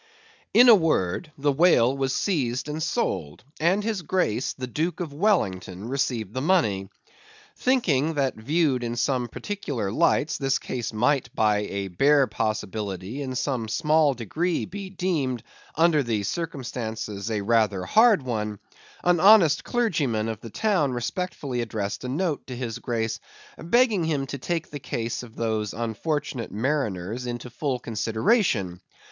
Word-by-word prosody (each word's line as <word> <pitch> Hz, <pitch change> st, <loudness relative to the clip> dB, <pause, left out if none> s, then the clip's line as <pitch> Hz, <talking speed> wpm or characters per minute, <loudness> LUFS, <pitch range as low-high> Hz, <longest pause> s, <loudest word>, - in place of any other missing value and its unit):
In 245 Hz, -, +7 dB
a 235 Hz, -, +10 dB
word, 160 Hz, -, +1 dB
the 145 Hz, +1 st, +2 dB
whale 135 Hz, -5 st, +4 dB
was 135 Hz, -1 st, -1 dB
seized 135 Hz, -, -1 dB
and 150 Hz, +1 st, -4 dB
sold, 95 Hz, -, -2 dB, 0.2 s
and 185 Hz, +6 st, +2 dB
his 215 Hz, -3 st, -1 dB
Grace 150 Hz, -, 0 dB
the 130 Hz, -, -5 dB
Duke 155 Hz, +7 st, -2 dB
of 165 Hz, -5 st, -4 dB
Wellington 100 Hz, -, 0 dB
received 125 Hz, -6 st, -1 dB
the 130 Hz, -, -2 dB
money. 110 Hz, -, +1 dB, 0.7 s
Thinking 165 Hz, -, +1 dB
that 135 Hz, -2 st, +1 dB
viewed 140 Hz, +2 st, 0 dB
in 120 Hz, 0 st, -2 dB
some 125 Hz, 0 st, 0 dB
particular 130 Hz, -, -4 dB
lights, 155 Hz, +2 st, +2 dB
the 135 Hz, -1 st, +1 dB
case 120 Hz, -2 st, -4 dB
might 125 Hz, +4 st, +1 dB
by 105 Hz, -3 st, +3 dB
a 100 Hz, 0 st, -3 dB
bare 140 Hz, +9 st, +4 dB
possibility 110 Hz, -1 st, -3 dB
in 130 Hz, -2 st, -4 dB
some 125 Hz, -3 st, -1 dB
small 150 Hz, +3 st, +2 dB
degree 160 Hz, -, -1 dB
be 195 Hz, +1 st, -7 dB
deemed, 155 Hz, -, -1 dB, 0.3 s
under 160 Hz, -2 st, +4 dB
the 115 Hz, -5 st, -1 dB
circumstances, 115 Hz, -, -4 dB
a 105 Hz, -2 st, -1 dB
rather 105 Hz, -3 st, +1 dB
hard 220 Hz, -, +5 dB
one, 105 Hz, -4 st, -3 dB, 0.5 s
an 175 Hz, -1 st, +3 dB
honest 185 Hz, -6 st, +6 dB
clergyman 150 Hz, -, 0 dB
of 110 Hz, -2 st, -4 dB
the 115 Hz, -, -8 dB
town 155 Hz, -, +1 dB
respectfully 130 Hz, -1 st, -3 dB
addressed 105 Hz, -2 st, -3 dB
a 125 Hz, -, -4 dB
note 155 Hz, +2 st, -2 dB
to 130 Hz, -, -6 dB
his 120 Hz, -3 st, -4 dB
Grace, 110 Hz, -2 st, -2 dB, 0.4 s
begging 210 Hz, 0 st, +2 dB
him 145 Hz, -4 st, 0 dB
to 140 Hz, +1 st, -6 dB
take 170 Hz, +5 st, -3 dB
the 145 Hz, -, -5 dB
case 115 Hz, -3 st, -3 dB
of 115 Hz, -2 st, -12 dB
those 110 Hz, -2 st, -1 dB
unfortunate 120 Hz, +3 st, -3 dB
mariners 115 Hz, -2 st, -2 dB
into 120 Hz, 0 st, -5 dB
full 135 Hz, +1 st, -2 dB
consideration. 110 Hz, -, 0 dB
130 Hz, 150 wpm, -25 LUFS, 110-160 Hz, 0.7 s, a